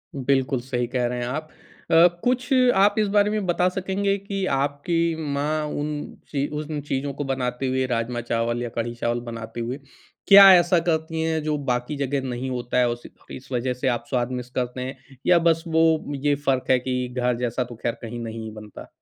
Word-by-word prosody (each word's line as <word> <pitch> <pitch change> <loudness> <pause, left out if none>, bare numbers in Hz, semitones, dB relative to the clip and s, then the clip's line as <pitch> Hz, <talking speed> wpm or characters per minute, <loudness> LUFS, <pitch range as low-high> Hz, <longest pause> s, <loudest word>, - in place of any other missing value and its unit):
बिल्कुल, 135 0 +1
सही 125 -1 -2
कह 125 0 -1
रहे 125 0 -3
हैं 120 - -2
आप। 155 +5 -4 0.4
अ, 165 +2 +8 0.2
कुछ 250 0 +1 0.3
आप 195 +2 +4
इस 210 - +2
बारे 205 0 +5
में 210 -2 -1
बता 180 0 +2
सकेंगे 195 +2 -1
कि 195 -1 -3
आपकी 160 +4 0 0.2
माँ 150 +2 -1
उन 150 0 -4 0.2
चीज़ 140 -1 -1
उन 150 0 -4
चीज़ों 140 0 -3
को 145 - -4
बनाते 130 -1 -2
हुए, 130 0 0
राजमा 120 -1 -2
चावल 120 0 -1
या 120 - -3
कढ़ी-चावल 120 0 -2
बनाते 115 0 -7
हुए, 125 +4 -4 0.5
क्या 195 -1 +10
ऐसा 175 0 +4
करती 160 0 0
हैं, 160 0 0
जो 155 -1 0
बाकी 125 +3 -1
जगह 140 0 -1
नहीं 125 +2 -3
होता 125 0 -2
है, 125 - +4
उस 120 0 -5 0.3
इस 130 - -10
वज़ह 125 0 0
से 125 +2 -3
आप 120 -2 0
स्वाद 125 -1 0
मिस 125 -1 -5
करते 125 0 -3
हैं? 130 +1 -5 0.3
या 175 -1 +5
बस 165 -1 +2
वो 160 -2 +2
ये 145 -1 +4
फ़र्क 130 -2 +1
है 130 - +5
कि 125 0 -2
घर 125 -1 +1
जैसा 125 +1 -1
तो 120 0 -10
ख़ैर 120 - 0
कहीं 120 +1 -6
नहीं 115 -1 -6
ही 110 - -6
बनता? 105 -1 -11
135 Hz, 200 wpm, -24 LUFS, 125-160 Hz, 0.5 s, क्या